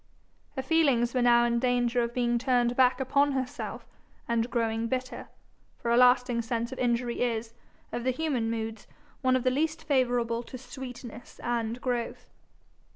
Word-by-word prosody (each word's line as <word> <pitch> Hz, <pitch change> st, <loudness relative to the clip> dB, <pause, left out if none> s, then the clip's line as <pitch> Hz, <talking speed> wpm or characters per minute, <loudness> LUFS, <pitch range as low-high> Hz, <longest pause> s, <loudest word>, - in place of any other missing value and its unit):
Her 265 Hz, -, -3 dB
feelings 265 Hz, -6 st, +2 dB
were 255 Hz, -, +1 dB
now 240 Hz, 0 st, +5 dB
in 235 Hz, 0 st, +1 dB
danger 245 Hz, -1 st, +1 dB
of 235 Hz, 0 st, -1 dB
being 240 Hz, -1 st, +1 dB
turned 245 Hz, -1 st, +2 dB
back 255 Hz, 0 st, +4 dB
upon 280 Hz, +2 st, +2 dB
herself, 260 Hz, -2 st, -4 dB, 0.4 s
and 235 Hz, 0 st, 0 dB
growing 230 Hz, -1 st, 0 dB
bitter; 255 Hz, +2 st, -4 dB, 0.5 s
for 235 Hz, -, -2 dB
a -, -, +4 dB
lasting 250 Hz, -1 st, +4 dB
sense 235 Hz, +1 st, -2 dB
of 260 Hz, -, -7 dB
injury 240 Hz, -1 st, 0 dB
is, 230 Hz, -2 st, -1 dB, 0.4 s
of 240 Hz, -, -3 dB
the 260 Hz, -, +1 dB
human 255 Hz, -4 st, -1 dB
moods, 225 Hz, -1 st, -4 dB, 0.3 s
one 255 Hz, -2 st, +3 dB
of 255 Hz, -, 0 dB
the 255 Hz, -, +3 dB
least 315 Hz, +4 st, -1 dB
favourable 245 Hz, -5 st, +1 dB
to 255 Hz, -, -9 dB
sweetness 245 Hz, -2 st, -9 dB
and 235 Hz, -1 st, -1 dB
growth. 245 Hz, -2 st, -3 dB
245 Hz, 160 wpm, -28 LUFS, 235-255 Hz, 0.5 s, now